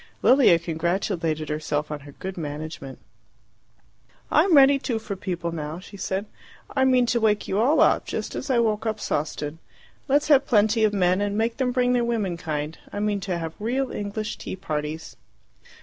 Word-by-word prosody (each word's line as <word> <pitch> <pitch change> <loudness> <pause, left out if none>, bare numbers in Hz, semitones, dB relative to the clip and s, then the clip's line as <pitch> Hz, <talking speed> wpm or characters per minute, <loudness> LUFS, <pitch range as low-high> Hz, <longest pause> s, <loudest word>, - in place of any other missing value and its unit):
Lilia 255 -10 +6
congratulated 165 -1 -1
herself 150 0 -2
on 150 - -4
her 145 0 -13
good 190 +5 -6
management. 150 -3 -6 1.3
"I'm 370 -5 +5
ready, 275 0 +7
too, 245 -4 -2
for 215 -2 -5
people 175 -2 -3
now," 155 -1 -5
she 190 +3 -12
said. 195 +1 -3 0.5
"I 265 -1 +3
mean 255 -1 +4
to 235 0 +1
wake 215 -2 +1
you 195 - 0
all 270 +8 +4
up, - - +3
just - - -4
as 280 - -5
I 255 - +3
woke 220 -1 +1
up 215 -1 -2
Sawston. 150 +1 -3 0.5
Let's 290 +2 +2
have 280 -2 +5
plenty 220 0 +3
of 215 - +4
men 185 -1 +2
and 205 0 -1
make 230 +1 0
them 260 -2 +1
bring 250 0 +2
their 245 -1 +2
womenkind. 170 -9 -2
I - - -4
mean 205 -1 0
to 185 -2 -3
have 165 -1 -5
real 255 +5 -1
English 210 +1 -4
tea - - -5
parties." 155 -3 -5
200 Hz, 180 wpm, -24 LUFS, 160-235 Hz, 1.3 s, ready